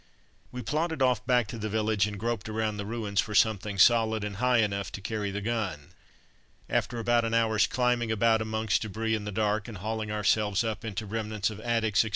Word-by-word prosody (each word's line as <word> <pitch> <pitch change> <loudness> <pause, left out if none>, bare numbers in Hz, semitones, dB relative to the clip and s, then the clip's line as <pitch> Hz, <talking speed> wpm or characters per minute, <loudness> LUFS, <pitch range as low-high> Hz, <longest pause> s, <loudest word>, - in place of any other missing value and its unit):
We 125 0 -6
plodded 160 -1 -1
off 125 -1 +2
back 125 -2 +3
to 115 - -6
the 110 0 -3
village 105 -1 +1
and 105 -1 -6
groped 115 -1 -2
around 110 -1 -1
the 100 -1 -5
ruins 105 -3 0
for 105 - -6
something 105 -2 +2
solid 110 0 +4
and 105 -2 -4
high 125 +2 +3
enough 100 -3 0
to - - -5
carry 105 0 -3
the 100 +1 -4
gun. 100 -10 -3 0.8
After 120 - -1
about 120 +1 +2
an 115 0 0
hour's 110 -2 +3
climbing 125 -2 +1
about 110 +1 +3
amongst 110 -2 0
debris 110 +1 -2
in 105 -2 -2
the 105 - -4
dark, 105 +1 0
and 115 -4 -7
hauling 110 +2 -3
ourselves 105 0 +1
up 110 -1 -3
into 110 -1 -4
remnants 110 0 -2
of 105 - -8
attics, 110 -3 0
etc. 110 - +3
110 Hz, 205 wpm, -28 LUFS, 105-115 Hz, 0.8 s, solid